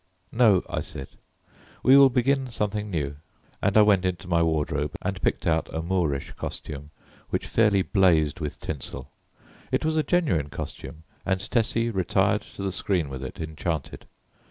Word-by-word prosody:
"No," 110 -6 +4
I - - -2
said, 65 - -7 0.7
"we 130 - +7
will 140 -1 +8
begin 130 +1 +1
something 105 -2 -2
new;" 75 -6 -2 0.4
and 100 +2 +2
I 105 - +8
went 100 -3 +4
into 90 -2 -2
my 85 -1 +2
wardrobe 75 -2 0
and - - -3
picked - - 0
out 80 -1 +1
a 80 - -3
Moorish 80 -6 -1
costume 75 -1 -6 0.4
which - - -1
fairly 105 -4 +3
blazed 90 -6 +3
with 75 -2 -5
tinsel. 75 -4 -6 0.6
It - - +1
was 160 0 +1
a - - +4
genuine 150 - +1
costume, 80 +2 -7 0.2
and 95 0 0
Tessie 115 0 +1
retired 95 -5 +1
to - - -9
the 95 - -1
screen 90 -4 0
with 65 0 -6
it 65 - -7
enchanted. 80 -1 -4
90 Hz, 160 wpm, -26 LUFS, 80-110 Hz, 0.7 s, will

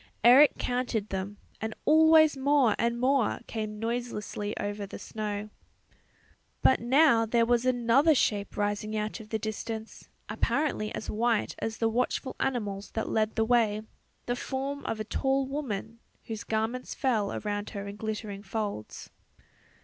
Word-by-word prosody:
Eric 260 +6 +7
counted 245 -4 -1
them 195 +2 -4 0.2
and 220 0 -3
always 315 -1 +6
more 270 -4 +3
and 235 0 0
more 260 -2 +2
came 215 -1 -4
noiselessly 225 -2 -3
over 205 0 -3
the - - -8
snow. 210 -1 -5 1.1
But 260 - +5
now 240 -1 +4
there 230 +1 +3
was 240 +1 +2
another 255 +5 +4
shape 205 -5 0
rising 210 +1 -1
out 215 +1 -3
of 215 -1 -11
the 220 - 0
distance, 220 +1 -6 0.2
apparently 280 -8 0
as - - -5
white 230 0 +1
as 225 0 -3
the 225 - +1
watchful 250 +3 -1
animals 210 -7 -2
that 220 - -2
led 220 0 0
the 225 - +2
way, 220 -3 +2 0.4
the 245 - -1
form 275 +2 -4
of 220 - -2
a - - -1
tall 270 +4 0
woman 230 -5 -4 0.3
whose 225 0 -5
garments 225 +3 -2
fell 220 -6 0
around 205 0 -3
her 200 0 -6
in 200 - -6
glittering 210 -2 -5
folds. 205 - -5
225 Hz, 150 wpm, -28 LUFS, 210-250 Hz, 1.1 s, Eric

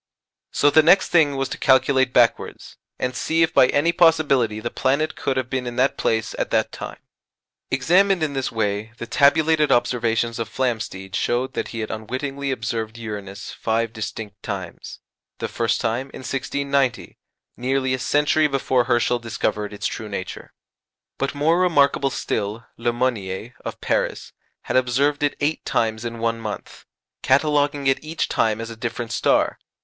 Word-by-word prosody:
So 145 - +3
the 155 +2 +7
next 180 +5 +5
thing 155 -5 +4
was 135 0 -1
to - - -6
calculate 130 -1 +3
backwards, 120 -2 +1 0.2
and 130 0 -2
see 165 +6 +1
if 165 - 0
by 125 - +6
any 145 +6 +2
possibility 155 - +3
the 120 +2 -4
planet 140 +4 0
could 135 - -2
have 130 -2 -1
been 130 -1 -3
in 120 - -5
that 130 +2 +2
place 110 -1 0
at - - -1
that - - +1
time. - - -7 0.7
Examined 175 +7 +3
in 150 -2 -1
this 135 -2 -2
way 110 0 -2
the - - -5
tabulated 150 +4 +3
observations 115 -1 +1
of 115 -2 -3
Flamsteed 110 -6 -3
showed 120 +5 0
that - - -3
he 115 - -5
had 110 - -4
unwittingly 135 +6 -4
observed 110 -2 -3
Uranus 105 -3 -7
five 115 0 -1
distinct 110 -2 -6
times, 95 -5 -7 0.4
the - - -3
first 115 -2 0
time 120 +3 -1
in - - -8
1690, 135 -1 -1 0.4
nearly 130 +1 0
a 130 - -1
century 150 +3 +2
before 130 -3 +1
Herschel 120 0 +2
discovered 105 -2 -2
its 105 - -6
true 110 -1 -3
nature. 95 -2 -6 0.7
But 135 +1 -1
more 160 +4 +2
remarkable 140 -6 +3
still, 110 -3 -3
Le 120 +1 0
Monnier, 115 -3 -2
of - - -6
Paris, - - -1 0.3
had - - -4
observed 135 +4 +1
it 145 -1 +1
eight 150 +2 -1
times 110 0 0
in 115 -1 -5
one 115 0 -1
month, 110 -2 -7 0.4
cataloguing 145 0 +2
it 135 +2 +2
each 160 +2 -2
time 110 -1 +1
as 115 0 -5
a - - -8
different 120 0 -4
star. - - +1
125 Hz, 165 wpm, -22 LUFS, 115-140 Hz, 0.7 s, the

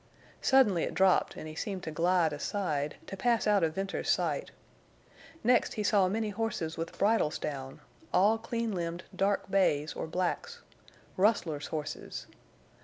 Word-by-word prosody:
Suddenly 230 -10 +4
it - - -2
dropped, 190 0 +3
and 155 - -7
he 155 - -7
seemed 185 +3 -4
to 160 - -4
glide 170 0 +2
aside, 150 -2 -2
to - - -6
pass 235 +3 +1
out 205 -3 +3
of 160 -1 0
Venters's 195 0 -3
sight. - - 0 0.9
Next 245 +1 +3
he 210 - -1
saw 200 -2 +4
many 215 +2 -1
horses 200 -7 -2
with 165 0 -5
bridles 205 -7 +2
down—all 155 +9 -1
clean 230 0 -2
limbed, 170 -1 -3
dark 195 0 0
bays 155 -6 +2
or - - -4
blacks—rustlers' 185 - -2
horses! 155 -2 -5
185 Hz, 140 wpm, -30 LUFS, 160-210 Hz, 0.9 s, Suddenly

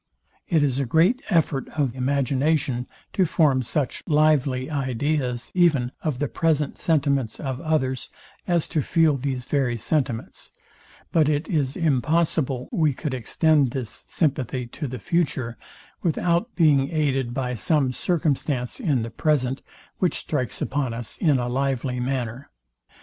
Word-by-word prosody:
It 160 -4 +3
is 135 -2 +1
a 140 - 0
great 175 - +3
effort 160 - +1
of 135 -5 +1
imagination, 135 0 0 0.3
to 190 - +3
form 150 -6 +3
such 130 +2 -1
lively 145 -5 +2
ideas 130 -2 -1
even 150 -9 +3
of 150 -6 -1
the 145 +2 -1
present 155 -2 0
sentiments 140 -7 +1
of 135 -2 -4
others 140 -5 -1 0.4
as 170 -3 +1
to 155 - 0
feel 160 0 +3
these 130 -2 -3
very 130 -4 0
sentiments; 125 -1 -2 0.6
but 155 -3 +3
it 150 +1 0
is 145 -6 0
impossible 150 -3 +1
we 155 -4 +2
could 145 0 -3
extend 140 +3 +2
this 125 -5 -5
sympathy 130 -5 0
to 140 +5 -6
the 130 0 -5
future, 135 - -1 0.5
without 175 +6 0
being 145 -5 +4
aided 135 -6 0
by 125 0 -2
some 130 +3 +1
circumstance 145 - -1
in 145 - +1
the 115 - -5
present, 135 0 0 0.4
which 180 - +2
strikes 130 -6 -2
upon 135 -4 -1
us 115 -1 -6
in 150 -6 +3
a 120 -1 -1
lively 130 -1 -1
manner. 125 0 -3
140 Hz, 140 wpm, -24 LUFS, 125-155 Hz, 0.6 s, being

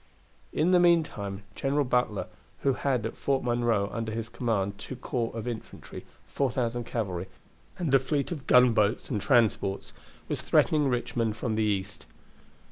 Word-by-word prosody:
In 165 +4 +2
the 180 - +6
meantime 145 - +1
General 140 +5 0
Butler, 125 -5 0 0.4
who 135 - +2
had 130 -4 0
at 115 - -4
Fort 135 -1 0
Monroe 120 -4 +1
under 115 -1 -3
his 115 0 -4
command 105 -5 -1
two 130 - -7
corps 120 -2 -2
of 115 0 -5
infantry, 120 -2 -7 0.2
4,000 120 -3 -1
cavalry, 95 -7 -3 0.5
and 165 -6 -1
a 135 - +7
fleet 140 +3 -1
of 150 -6 -6
gunboats 115 -3 +4
and 105 -5 -1
transports, 110 -6 +1 0.3
was - - -3
threatening 150 -2 +3
Richmond 120 -3 -1
from 110 0 -2
the 110 - 0
east. 100 -2 -2
120 Hz, 150 wpm, -28 LUFS, 105-135 Hz, 0.5 s, a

